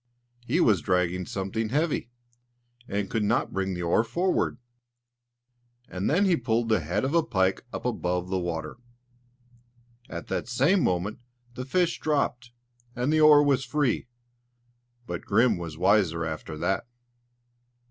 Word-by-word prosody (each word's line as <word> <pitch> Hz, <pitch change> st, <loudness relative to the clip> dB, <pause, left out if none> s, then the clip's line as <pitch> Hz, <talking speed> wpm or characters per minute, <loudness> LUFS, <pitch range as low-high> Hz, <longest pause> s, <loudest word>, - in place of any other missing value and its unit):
He -, -, +1 dB
was 100 Hz, -6 st, +4 dB
dragging 90 Hz, -1 st, 0 dB
something 105 Hz, +3 st, -3 dB
heavy, 145 Hz, -1 st, 0 dB, 0.8 s
and 100 Hz, 0 st, -2 dB
could 110 Hz, -, -1 dB
not 105 Hz, -, 0 dB
bring 95 Hz, -1 st, -1 dB
the 90 Hz, -, -4 dB
oar 85 Hz, +6 st, +3 dB
forward; 175 Hz, +2 st, 0 dB, 1.3 s
and 95 Hz, +1 st, -2 dB
then 180 Hz, +7 st, +3 dB
he 185 Hz, -3 st, +4 dB
pulled 115 Hz, -4 st, 0 dB
the 110 Hz, -2 st, +3 dB
head 90 Hz, -, -1 dB
of 135 Hz, -, -2 dB
a 170 Hz, -, +5 dB
pike 95 Hz, -11 st, 0 dB
up -, -, -6 dB
above 90 Hz, -7 st, -1 dB
the 95 Hz, 0 st, -1 dB
water. 80 Hz, -2 st, -4 dB, 1.3 s
At 85 Hz, -, -6 dB
the -, -, -2 dB
same 140 Hz, -, +2 dB
moment 90 Hz, +4 st, -1 dB, 0.3 s
the 125 Hz, +1 st, -6 dB
fish 175 Hz, +5 st, +1 dB
dropped, 140 Hz, -5 st, -1 dB, 0.5 s
and 125 Hz, +5 st, 0 dB
the 155 Hz, -, +3 dB
oar 150 Hz, -1 st, +8 dB
was 140 Hz, -2 st, +2 dB
free; 145 Hz, -4 st, 0 dB, 1.0 s
but 85 Hz, -5 st, -5 dB
Grim 110 Hz, 0 st, +2 dB
was 80 Hz, -3 st, -6 dB
wiser 90 Hz, -3 st, +2 dB
after 80 Hz, 0 st, -5 dB
that. 95 Hz, +7 st, -1 dB
110 Hz, 145 wpm, -27 LUFS, 90-135 Hz, 1.3 s, oar